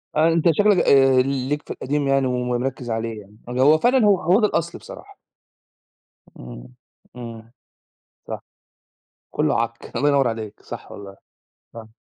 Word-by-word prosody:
آآ، 160 Hz, +1 st, +4 dB
أنت 165 Hz, 0 st, 0 dB
شكلك 205 Hz, +3 st, +3 dB
آآ، 135 Hz, -4 st, +4 dB
ليك 135 Hz, +2 st, -2 dB
في -, -, -11 dB
القديم 145 Hz, +1 st, -2 dB
يعني 135 Hz, -1 st, +2 dB
ومركِّز 125 Hz, 0 st, -3 dB
عليه 115 Hz, -1 st, -3 dB
يعني. 105 Hz, +2 st, -19 dB
هو 135 Hz, +5 st, +4 dB
فعلًا 245 Hz, +4 st, +3 dB
هو 200 Hz, -3 st, +3 dB
هو 180 Hz, +7 st, +3 dB
ده 210 Hz, -, +3 dB
الأصل 170 Hz, -2 st, -3 dB
بصراحة. -, -, -13 dB, 1.2 s
إمم، -, -, -11 dB, 0.4 s
إمم. 115 Hz, -2 st, -10 dB, 0.8 s
صح، -, -, -5 dB, 0.9 s
كله -, -, 0 dB
عك. 115 Hz, 0 st, -7 dB
الله 145 Hz, -, +2 dB
ينوّر 140 Hz, -3 st, +3 dB
عليك 110 Hz, -2 st, -6 dB
صح، -, -, -10 dB
والله 100 Hz, -1 st, -10 dB, 0.6 s
صح. 115 Hz, -1 st, -9 dB
130 Hz, 145 wpm, -22 LUFS, 115-150 Hz, 1.2 s, آآ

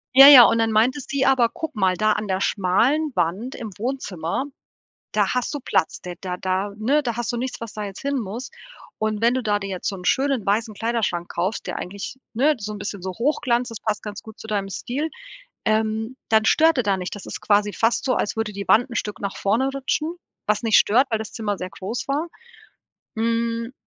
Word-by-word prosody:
Ja, 270 Hz, +1 st, +11 dB
ja, 275 Hz, -4 st, +12 dB
und 230 Hz, -, +3 dB
dann 225 Hz, 0 st, +2 dB
meinte 230 Hz, +6 st, +3 dB
sie: 275 Hz, -1 st, 0 dB
„Aber 260 Hz, -3 st, +4 dB
guck 320 Hz, -, -6 dB
mal, 190 Hz, -3 st, +2 dB
da 215 Hz, +2 st, +2 dB
an 210 Hz, -, -3 dB
der 190 Hz, 0 st, -1 dB
schmalen 235 Hz, +13 st, +2 dB
Wand 200 Hz, +11 st, -1 dB
im 225 Hz, -, -6 dB
Wohnzimmer, 220 Hz, -5 st, -3 dB, 0.7 s
da -, -, +2 dB
hast 250 Hz, +2 st, -1 dB
du 290 Hz, -, -3 dB
Platz, 185 Hz, -9 st, 0 dB
da 180 Hz, -, -6 dB
da 180 Hz, -2 st, -4 dB
da 190 Hz, +2 st, -1 dB
ne, 275 Hz, +8 st, +2 dB
da 235 Hz, -4 st, -2 dB
hast 240 Hz, -3 st, -1 dB
du 240 Hz, -, -3 dB
nichts, 255 Hz, +2 st, -4 dB
was 230 Hz, -2 st, -6 dB
da 210 Hz, -, -5 dB
jetzt 195 Hz, -1 st, -8 dB
hin 280 Hz, 0 st, -1 dB
muss. 225 Hz, +4 st, -5 dB, 0.5 s
Und 215 Hz, -1 st, -1 dB
wenn 235 Hz, +1 st, +4 dB
du 260 Hz, -, -1 dB
da 205 Hz, -2 st, +1 dB
dir 200 Hz, -1 st, -5 dB
jetzt 185 Hz, -2 st, -3 dB
so 200 Hz, -, -5 dB
'n 180 Hz, -, -10 dB
schönen 270 Hz, -3 st, +1 dB
weißen 215 Hz, +2 st, 0 dB
Kleiderschrank 225 Hz, -6 st, -1 dB
kaufst, 185 Hz, +5 st, -2 dB
der -, -, -3 dB
eigentlich, 200 Hz, +7 st, -6 dB, 0.2 s
ne, 285 Hz, +7 st, +3 dB
so 210 Hz, 0 st, -5 dB
'n -, -, -6 dB
bisschen 205 Hz, -1 st, -5 dB
so 185 Hz, +1 st, -4 dB
Hochglanz, 245 Hz, -1 st, +1 dB
das 230 Hz, -, -7 dB
passt 215 Hz, -1 st, -2 dB
ganz 210 Hz, -1 st, -6 dB
gut 220 Hz, -1 st, -12 dB
zu -, -, -9 dB
deinem 200 Hz, -2 st, -2 dB
Stil, 275 Hz, +10 st, -3 dB, 0.6 s
ähm, 220 Hz, +2 st, 0 dB
dann 220 Hz, -1 st, +4 dB
stört 320 Hz, +4 st, +4 dB
er 250 Hz, -, +2 dB
da 200 Hz, -2 st, +2 dB
nicht.“ 180 Hz, 0 st, -5 dB
Das 205 Hz, -, -9 dB
ist -, -, -6 dB
quasi 205 Hz, 0 st, +2 dB
fast 225 Hz, +1 st, +1 dB
so, 255 Hz, -2 st, +2 dB
als -, -, -1 dB
würde 225 Hz, -1 st, -2 dB
die 200 Hz, 0 st, -6 dB
Wand 245 Hz, +4 st, +5 dB
'n 235 Hz, -, -8 dB
Stück 210 Hz, -2 st, -3 dB
nach 200 Hz, -1 st, -3 dB
vorne 230 Hz, +7 st, +1 dB
rutschen, 300 Hz, +4 st, -2 dB, 0.3 s
was 210 Hz, +1 st, +1 dB
nicht 225 Hz, -2 st, +5 dB
stört, 250 Hz, +6 st, +4 dB
weil 220 Hz, -, +1 dB
das 220 Hz, 0 st, -7 dB
Zimmer 205 Hz, -3 st, -2 dB
sehr 185 Hz, -, -5 dB
groß 195 Hz, -, -5 dB
war. 290 Hz, +4 st, -1 dB, 0.9 s
Hm. 230 Hz, +1 st, -1 dB
220 Hz, 225 wpm, -23 LUFS, 200-250 Hz, 0.9 s, ja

